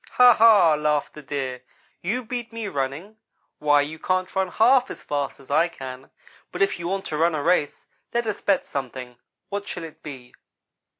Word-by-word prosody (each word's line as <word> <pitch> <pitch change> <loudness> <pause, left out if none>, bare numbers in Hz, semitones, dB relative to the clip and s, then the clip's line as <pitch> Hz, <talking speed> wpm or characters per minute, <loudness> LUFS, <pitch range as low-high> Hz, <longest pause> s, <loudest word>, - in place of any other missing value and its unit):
"'Ha 250 -1 +8
ha!' 215 -7 +6
laughed 150 -1 0
the 150 - -10
Deer 130 -3 -4 0.4
'you 235 +8 -2
beat 240 0 -5
me 225 -2 -5
running? 145 +7 -4 0.4
Why, 145 -1 +4
you 155 +2 -5
can't 185 +2 -1
run 190 0 +1
half 250 +7 +4
as - - -9
fast 145 -2 -3
as 135 0 -13
I 160 +4 +4
can, 130 -5 -9 0.4
but - - +1
if 195 - 0
you 170 - -4
want 195 +1 -2
to 155 - -3
run 165 +1 +2
a 145 - -2
race 165 -3 +1 0.3
let 235 0 0
us 215 -2 -3
bet 195 -2 +1
something. 125 -2 -6 0.3
What 200 0 -4
shall 180 - -5
it 160 -2 -10
be?' 130 -5 -10
165 Hz, 190 wpm, -24 LUFS, 145-205 Hz, 0.4 s, Ha